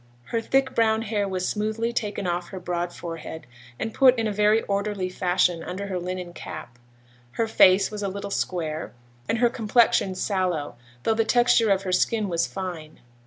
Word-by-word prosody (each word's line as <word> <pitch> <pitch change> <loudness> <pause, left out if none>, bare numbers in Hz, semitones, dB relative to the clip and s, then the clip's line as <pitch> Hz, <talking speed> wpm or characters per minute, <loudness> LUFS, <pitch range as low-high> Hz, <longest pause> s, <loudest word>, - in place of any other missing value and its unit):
Her 230 - 0
thick 265 +2 +1
brown 225 -1 +2
hair 205 -2 -1
was 185 -1 -2
smoothly 220 +2 -1
taken 210 -4 -2
off 175 0 -2
her 190 - -7
broad 175 -1 -3
forehead, 165 -3 -7 0.3
and 220 - -4
put 255 -2 +5
in 225 - 0
a 215 - -1
very 210 +2 +3
orderly 200 -2 -2
fashion, 180 -2 +1
under 185 +3 -5
her 185 -2 -2
linen 180 0 -5
cap; 120 -7 -9 0.5
her 225 - 0
face 195 -2 +5
was 210 -1 -5
a 200 - -1
little 200 +1 -6
square, 160 -7 -3 0.4
and 225 - +1
her 240 +1 +4
complexion 225 -4 +2
sallow, 185 -6 -1 0.3
though 225 - +2
the 225 +1 +2
texture 240 -1 +4
of 195 -1 +2
her 185 - -3
skin 210 +2 +1
was 170 -1 0
fine. 175 -5 -6
200 Hz, 180 wpm, -25 LUFS, 180-220 Hz, 0.5 s, put